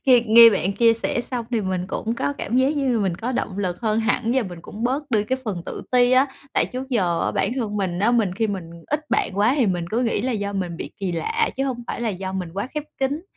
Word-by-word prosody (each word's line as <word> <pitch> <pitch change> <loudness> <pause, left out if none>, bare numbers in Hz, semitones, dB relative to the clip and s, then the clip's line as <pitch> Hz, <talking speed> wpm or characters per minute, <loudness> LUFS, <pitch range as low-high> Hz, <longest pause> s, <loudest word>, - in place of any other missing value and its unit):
khi 250 -2 +7
nghe 230 +1 +9
bạn 195 -2 0
chia 230 +2 +4
sẻ 230 +1 -1
xong 240 -1 -4
thì 230 -3 +1
mình 185 -2 -2
cũng 225 +3 -3
có 265 +4 -1
cảm 245 -4 -3
giác 265 +4 +3
như 270 -3 +1
là 230 - +1
mình 190 -4 0
có 235 +8 -3
động 205 -5 -3
lực 180 -3 -2
hơn 220 -1 +1
hẳn 225 +1 +1
và 260 - +3
mình 180 -5 -7
cũng 220 +3 -6
bớt 275 +3 -1
đi 210 -3 +2
cái 260 +4 -1
phần 190 -7 -3
tự - - -6
ti 250 -1 +4
á, 260 +2 +5 0.3
tại - - +2
trước 260 +1 -6
giờ 185 -10 +1
á, - - +1
bản - - 0
thân 215 -5 -2
mình 185 -3 -1
á, 215 +4 +3
mình 215 -7 +1
khi 220 +2 0
mình 190 -5 -5 0.2
ít 295 +1 -1
bạn 190 - 0
quá 215 +4 +4
thì 255 -6 +3
mình 175 -3 0
cứ 235 +3 +1
nghĩ 230 -4 0
là 255 +3 -1
do 205 -2 -2
mình 180 -4 -3
bị - - -6
kỳ 190 -3 -3
lạ 450 - 0
chứ 270 - 0
hông 250 -3 -3
phải - - -4
là 235 - 0
do 190 -1 -4
mình 185 -3 -3
quá 200 +4 -2
khép 300 -1 -2
kín. 280 +4 -1
225 Hz, 285 wpm, -23 LUFS, 195-255 Hz, 0.3 s, nghe